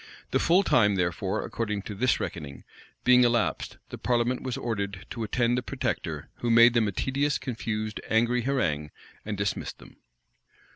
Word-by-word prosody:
The - - +2
full 180 +4 +4
time, 105 - +4
therefore, 90 -3 -1
according 105 -3 -3
to 105 - -6
this 120 +5 +1
reckoning, 70 -5 -6 0.4
being 125 0 +6
elapsed, 120 -2 0
the - - -8
parliament 120 +1 +1
was 130 0 -3
ordered 100 -7 -3
to 115 - -5
attend 120 +2 +1
the 125 - 0
protector, - - -3
who 120 - -2
made 115 +1 +7
them 115 -3 +3
a - - -1
tedious, 140 +8 0
confused, 110 -3 -4
angry 120 +2 +2
harangue, 85 - 0 0.3
and 105 -1 -4
dismissed 100 0 -2
them. - - -16
115 Hz, 160 wpm, -27 LUFS, 100-125 Hz, 0.4 s, made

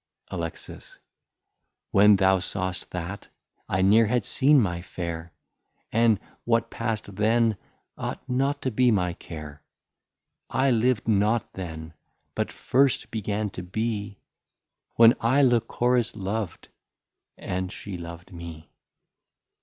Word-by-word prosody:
Alex. 85 -1 -7 0.9
When 105 +1 +7
thou 95 -1 +4
saw'st 95 0 -3
that, 90 +3 -6 0.4
I 95 +1 +1
ne'r 110 +3 +5
had 120 -2 0
seen 140 +2 +4
my 90 -7 0
Fair, 85 -2 -6 0.6
And 115 -3 +3 0.2
what 115 -1 +1
pass'd 110 -4 -3
then 110 +1 +3 0.4
ought - - -5
not 135 +3 0
to 130 - 0
be 125 +2 +3
my 90 -6 +1
Care; 75 -4 -9 0.9
I 135 0 +2
liv'd 120 0 +1
not 110 +1 +1
then, 80 -3 -7 0.4
but - - -2
first 135 +1 +1
began 105 -1 -2
to 90 - -6
be, 100 +1 -3 0.8
When 115 0 +8
I 130 +5 +3
Lycoris 120 0 +2
Lov'd, 100 -1 -4 0.7
and 95 0 -3
she 100 -2 -7
Lov'd 85 +1 -9
me. 85 -2 -9
105 Hz, 115 wpm, -26 LUFS, 90-115 Hz, 0.9 s, When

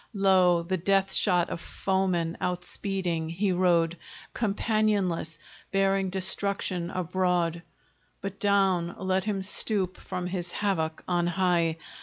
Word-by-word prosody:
Lo! 185 -3 +4
the 185 +2 -1
death 195 +2 +1
shot 180 -4 +3
of 170 - -4
foemen 185 -4 -1
outspeeding, 180 -2 -2
he 185 +4 0
rode 175 -2 +2 0.4
Companionless, 205 -7 0 0.3
bearing 195 0 +2
destruction 190 -1 -1
abroad; 180 -2 0 0.6
But 200 0 -6
down 190 -4 +2
let 190 0 0
him 200 -3 -1
stoop 190 -2 -1
from 180 - -5
his 180 -1 -4
havoc 165 -6 -1
on 175 -1 +1
high! 175 -3 +1
185 Hz, 115 wpm, -27 LUFS, 175-195 Hz, 0.6 s, Lo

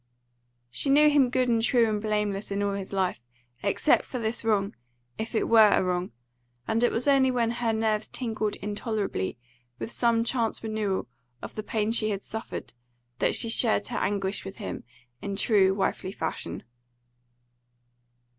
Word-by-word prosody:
She 275 - -2
knew 300 +2 +6
him 280 -4 +4
good 255 0 +1
and 230 -2 +2
true 235 0 +3
and 210 -1 -1
blameless 210 -1 -1
in 200 0 -1
all 200 0 0
his 195 -1 -5
life, 190 - -1 0.4
except 200 +9 +2
for 255 - -6
this 230 0 -2
wrong, 205 -3 +1 0.4
if 225 +1 -4
it - - +1
were 220 -2 +7
a - - +3
wrong; 180 0 -1 0.6
and 225 +2 +1
it 240 - +4
was 235 +5 -1
only 270 -2 +5
when 235 -2 +1
her 235 -1 0
nerves 220 -1 0
tingled 220 -4 -2
intolerably 205 - -3 0.4
with 225 - -5
some 235 -2 +2
chance 230 -2 -1
renewal 215 -3 -2 0.4
of - - -7
the 215 - -4
pain 215 0 -1
she 220 -2 +1
had 200 -1 -3
suffered, 220 +1 -6 0.5
that - - +2
she 230 - +1
shared 225 -2 +2
her - - -3
anguish 200 -1 -1
with 195 - -8
him 210 - -6 0.4
in 200 -1 -4
true 195 -2 +4
wifely 190 -1 -1
fashion. 160 -4 -4
220 Hz, 165 wpm, -27 LUFS, 200-230 Hz, 0.6 s, were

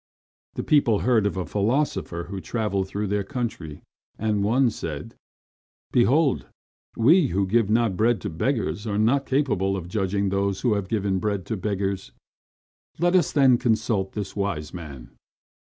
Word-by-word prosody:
The - - -3
people 120 -9 +3
heard 115 -5 +3
of 100 - -4
a 90 - -2
philosopher 105 - -1
who 95 +2 -6
travelled 100 -4 -2
through 100 +2 -3
their 100 0 -1
country, 95 - -5 0.3
and 105 -2 0
one 120 +4 +3
said: 75 -7 -6 0.8
"Behold, 135 +4 +2 0.5
we 150 +7 +5
who 100 -2 0
give 110 +1 +2
not 110 -3 +2
bread 110 +2 +2
to - - -3
beggars 110 - -2
are 100 -1 -1
not 125 +6 +2
capable 100 -9 +1
of 85 -2 -6
judging 100 +1 -1
those 100 0 -1
who 120 -4 +2
have 100 -2 -2
given 100 -4 0
bread 100 -2 -2
to 110 - -3
beggars. 100 -1 -3 0.8
Let 175 +3 +2
us, 175 -5 +3
then, 130 -4 +4
consult 110 -4 0
this 100 -2 -5
wise 95 -7 -3
man." 70 -8 -9
105 Hz, 155 wpm, -24 LUFS, 95-120 Hz, 0.8 s, we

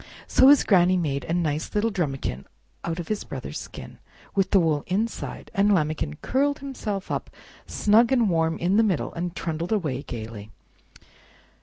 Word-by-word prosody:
So 260 - +5
his 285 0 +7
Granny 185 -2 +4
made 140 -6 -2
a 165 - -2
nice 155 -1 -2
little 220 +2 +2
drumikin 135 - -3 0.4
out 165 -1 -3
of 175 - -5
his 215 -1 -2
brother's - - -6
skin, - - -10 0.3
with 195 -2 +1
the 195 - +5
wool 155 -4 +1
inside, 215 +6 -3
and 205 -1 +3
Lambikin 155 - -1
curled 285 +3 +1
himself 225 -9 -5
up - - -3 0.4
snug 225 +4 +3
and 240 -4 +3
warm 165 -2 +1
in 185 +4 +1
the 225 - +5
middle, 190 -8 0
and 175 +1 -4
trundled 165 +3 -3
away 155 -11 0
gayly. 110 -4 -7
175 Hz, 165 wpm, -25 LUFS, 155-215 Hz, 0.4 s, his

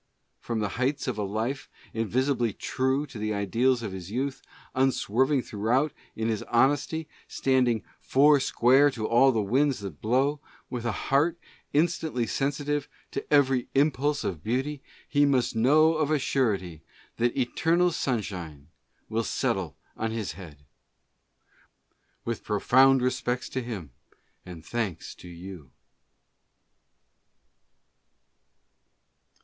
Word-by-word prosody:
From 115 -2 -3
the 105 - -1
heights 140 +3 0
of 120 -4 -2
a - - 0
life 110 +7 -3 0.2
invincibly 120 +1 0
true 130 +6 -1
to 130 -6 -10
the 110 0 -1
ideals 115 +5 +1
of 105 - -4
his 95 -1 -7
youth, 130 +5 -3 0.3
unswerving 130 +1 +2
throughout 120 +8 0 0.2
in 110 0 -2
his 110 -2 -1
honesty, 145 +6 +2 0.2
standing 125 -4 +1 0.2
"four 145 +2 +4
square 130 +3 +4
to 115 -5 -4
all 130 +3 +5
the 110 -4 0
winds 135 +7 +2
that 95 -7 -8
blow," 135 +6 +1 0.3
with 120 -2 -4
a 120 - +1
heart 145 - +1 0.3
instantly 155 -5 +1
sensi 140 +3 -2
tive 145 -1 -1 0.2
to 140 - -6
every 135 -4 +3
impulse 145 0 +2
of 85 -6 -4
beauty, 135 +5 -2 0.3
he 145 -1 +3
must 135 -5 +2
know 150 +8 +5
of 155 -2 0
a 155 - +3
surety 100 - -1 0.4
that 120 +3 0
"eternal 165 +7 +2
sunshine 90 - -4 0.4
will 115 +1 -1
settle - - -2 0.2
on 115 - -2
his 110 -6 -3
head." 75 -5 -12 1.6
With 115 -1 -3
profound 130 +5 +4
re 125 - +3
spects 125 0 -2
to 130 - -3
him 105 - -6 0.6
and 85 -3 -10
thanks 110 -8 -3
to - - -14
you. 85 -4 -10
125 Hz, 130 wpm, -27 LUFS, 110-140 Hz, 1.6 s, all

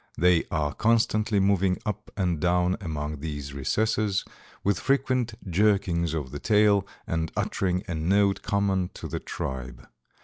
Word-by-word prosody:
They 90 0 +4
are 75 -3 -1
constantly 110 -2 +2
moving 95 -1 +2
up 105 0 -4
and 90 -5 0
down 90 +2 +2
among 75 -4 -4
these 75 -2 -5
recesses, 105 +7 0 0.4
with 100 0 +1
frequent 130 -4 +1
jerkings 90 -4 +2
of 70 -5 -4
the 70 - -5
tail, 105 +1 +3 0.2
and 80 -1 -2
uttering 90 -1 0
a 90 - -3
note 95 +5 +2
common 95 -3 0
to - - -6
the - - -4
tribe. 65 -2 -6
90 Hz, 140 wpm, -26 LUFS, 80-105 Hz, 0.4 s, They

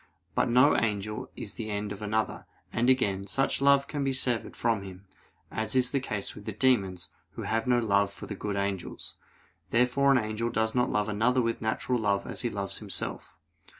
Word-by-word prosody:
But - - +2
no 125 +5 +6
angel 105 -1 -1
is 105 - -6
the 110 -2 -5
end 105 0 -2
of 100 0 -7
another; 110 +1 -1 0.3
and 120 +3 +2
again, 100 -7 +2
such 135 +6 0
love 140 0 +5
can 145 -2 -2
be 135 -1 +1
severed 125 -3 0
from 115 -3 +1
him, 95 0 -10 0.5
as 110 +3 -1
is 125 -1 +3
the 140 - +1
case 105 -6 -4
with 105 - -11
the 110 - -3
demons, 95 -6 +1 0.2
who - - -6
have 115 +2 -1
no 125 -1 +4
love 100 -4 +2
for - - -8
the - - -5
good 100 +1 -3
angels. 100 -2 -3 0.5
Therefore 125 +4 +3
an 135 - +6
angel 110 0 -1
does 110 -1 0
not 125 0 +2
love 105 0 +1
another 120 +4 +2
with 115 0 -1
natural 110 +3 0
love 100 -2 +1
as - - -5
he 120 - 0
loves 100 -3 -4
himself. - - -5
110 Hz, 200 wpm, -29 LUFS, 100-125 Hz, 0.5 s, no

